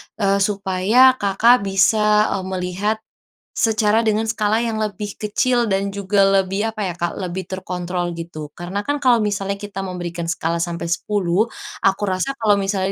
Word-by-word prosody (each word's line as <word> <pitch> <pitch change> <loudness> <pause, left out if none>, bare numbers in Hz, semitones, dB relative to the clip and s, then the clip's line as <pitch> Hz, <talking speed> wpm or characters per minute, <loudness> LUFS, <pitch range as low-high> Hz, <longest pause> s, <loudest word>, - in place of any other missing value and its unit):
eee, 200 -1 +1
supaya 200 +5 +4
Kakak 200 +2 +3
bisa, 210 +2 +3
eee, 190 - -2
melihat 190 +3 -2 0.6
secara 220 0 +2
dengan 220 +1 +2
skala 220 0 +1
yang 225 -2 -2
lebih 210 -1 -4
kecil 240 +3 +1
dan 195 +1 0
juga 200 0 +1
lebih, 195 +2 +1
apa 220 - -7
ya 180 - -3
kak, 175 -1 -3
lebih 185 0 -4
terkontrol, 180 -1 -3
gitu. 165 -3 -7
Karena 180 +4 -4
kan 290 0 +1
kalau 250 -2 +5
misalnya 200 -2 -1
kita 205 -2 -6
memberikan 175 -2 -5
skala 170 0 -1
sampai 170 -1 -4
10, 195 +3 0 0.4
aku 195 +1 +2
rasa 185 +8 -1
kalau 215 -2 +3
misalnya 195 -1 -1
195 Hz, 160 wpm, -20 LUFS, 185-215 Hz, 0.6 s, kalau